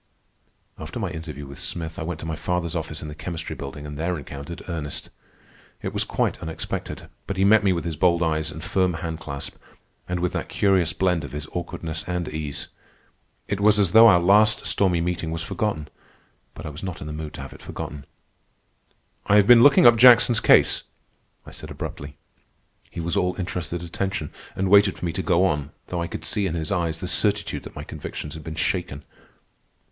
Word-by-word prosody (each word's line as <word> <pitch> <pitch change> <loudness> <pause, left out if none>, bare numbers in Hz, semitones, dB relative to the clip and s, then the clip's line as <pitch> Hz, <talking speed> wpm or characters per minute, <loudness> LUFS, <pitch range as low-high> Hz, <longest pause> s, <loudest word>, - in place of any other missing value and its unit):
After - - -7
my - - -2
interview 80 -3 -7
with 70 0 -10
Smith 80 -1 -4
I - - -4
went 80 0 -4
to - - -6
my 80 -1 -3
father's 85 +1 -2
office 80 -1 -4
in - - -6
the 75 - -6
Chemistry 80 +1 -5
Building 70 +1 -7
and 75 0 -7
there 85 +2 -1
encountered 70 +4 -8
Ernest. 80 -5 -5 0.7
It - - -3
was - - 0
quite - - -1
unexpected, 80 0 -5 0.2
but 100 - -3
he 95 - +3
met 105 +1 +6
me 100 - +4
with 85 -3 -1
his 85 -2 -2
bold 85 +1 +3
eyes 80 -1 0
and 80 +1 -8
firm 90 -3 +1
hand 80 -1 -4
clasp, 70 -3 -6 0.5
and 90 0 -1
with 90 0 -1
that - - -3
curious 95 -5 +2
blend 90 0 +1
of - - -8
his 75 0 -4
awkwardness 80 -2 -4
and 90 -1 -2
ease. 75 -2 -5 0.8
It 100 - -2
was 105 +1 +5
as 100 -4 +3
though 115 +1 +9
our 90 -5 +7
last 105 +4 +4
stormy 90 -4 +2
meeting 85 -1 -2
was 80 0 -3
forgotten; 85 -4 -2 0.7
but - - -9
I - - -3
was 75 +3 -8
not 95 -3 -5
in - - -6
the 75 - -5
mood 75 0 -6
to - - -7
have - - -8
it - - -14
forgotten. 70 -1 -7 1.2
"I 100 - +4
have 105 -1 +6
been 120 +1 +8
looking 140 0 +7
up 120 -1 +8
Jackson's 120 -1 +7
case," - - +5 0.6
I - - -11
said - - -10
abruptly. 70 0 -7 0.7
He - - -8
was 85 +2 -2
all 90 -2 +1
interested 90 -2 -4
attention, 85 -1 -3 0.2
and 95 0 0
waited 100 0 +5
for - - -5
me 85 - -1
to 95 - -2
go 90 0 +3
on, 75 -5 0 0.2
though 90 -1 -2
I 85 - -2
could 80 - -7
see 95 +4 0
in 85 - -3
his 80 +1 -3
eyes 85 -4 -1
the 90 - -3
certitude 105 +2 +1
that - - -10
my - - -6
convictions 75 - -7
had 80 -1 -9
been 80 +1 -6
shaken. 80 -4 -2
85 Hz, 205 wpm, -24 LUFS, 80-95 Hz, 1.2 s, though